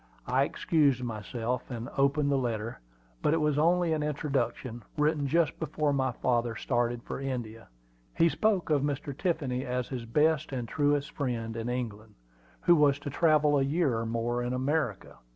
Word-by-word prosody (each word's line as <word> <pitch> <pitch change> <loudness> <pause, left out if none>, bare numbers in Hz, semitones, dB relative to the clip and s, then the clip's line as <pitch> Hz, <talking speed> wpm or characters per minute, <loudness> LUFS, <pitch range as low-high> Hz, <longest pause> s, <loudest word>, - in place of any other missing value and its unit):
I 130 +3 +2
excused 145 -7 +1
myself, 115 +2 -3
and 120 -2 -5
opened 140 +1 +2
the - - +3
letter; 115 -3 -2 0.4
but 150 - +3
it - - +2
was 150 -2 +1
only 170 +1 +3
an 155 - 0
introduction, 140 -5 -2 0.2
written 150 -1 +1
just 165 +2 +1
before 155 -2 0
my 130 -2 +1
father 120 -1 0
started 120 -1 -1
for - - -5
India. 120 -4 -5 0.5
He 165 - +5
spoke 195 -1 +1
of 145 -2 +3
Mr. 140 -1 -2
Tiffany 145 -7 -1
as 125 -1 -2
his 125 -3 -5
best 150 +5 +2
and 125 -3 -3
truest 145 +2 +1
friend 115 -5 -3
in 115 +1 -3
England, 110 -4 -4 0.5
who 175 - +5
was 145 -3 +4
to 145 0 -6
travel 150 -2 +3
a - - +2
year 140 -2 +1
or 115 - -3
more 115 +1 -1
in 120 +1 -2
America. 130 -4 -1
135 Hz, 170 wpm, -29 LUFS, 120-150 Hz, 0.5 s, He